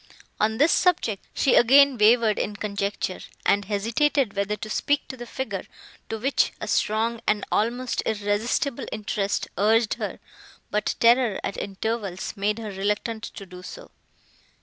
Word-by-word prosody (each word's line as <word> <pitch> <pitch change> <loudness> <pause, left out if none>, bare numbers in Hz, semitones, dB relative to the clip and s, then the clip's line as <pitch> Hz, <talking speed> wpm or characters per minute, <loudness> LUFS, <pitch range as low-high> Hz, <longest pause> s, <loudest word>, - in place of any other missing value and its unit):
On 220 +1 +1
this 295 +6 +4
subject, 275 - +1
she 265 - +2
again 275 +3 +6
wavered 220 0 +4
in 210 - -2
conjecture, 200 -2 -3 0.3
and 200 0 +3
hesitated 230 +4 +1
whether 200 +1 0
to 215 - -7
speak 285 +6 0
to - - -5
the 240 -1 -9
figure, 225 -7 -4 0.4
to 225 - -3
which 265 +5 +1
a - - -5
strong 225 +2 0
and 210 -1 +1
almost 240 +3 0
irresistible 220 +5 -1
interest 205 -2 -2
urged 220 +2 +3
her; - - -4 0.5
but 210 - 0
terror, 235 -3 +4
at - - -3
intervals, 200 -1 -3
made 210 +1 0
her 220 -2 -5
reluctant 210 +3 -2
to 195 - -8
do 180 -1 -11
so. - - -10
215 Hz, 150 wpm, -25 LUFS, 205-240 Hz, 0.5 s, again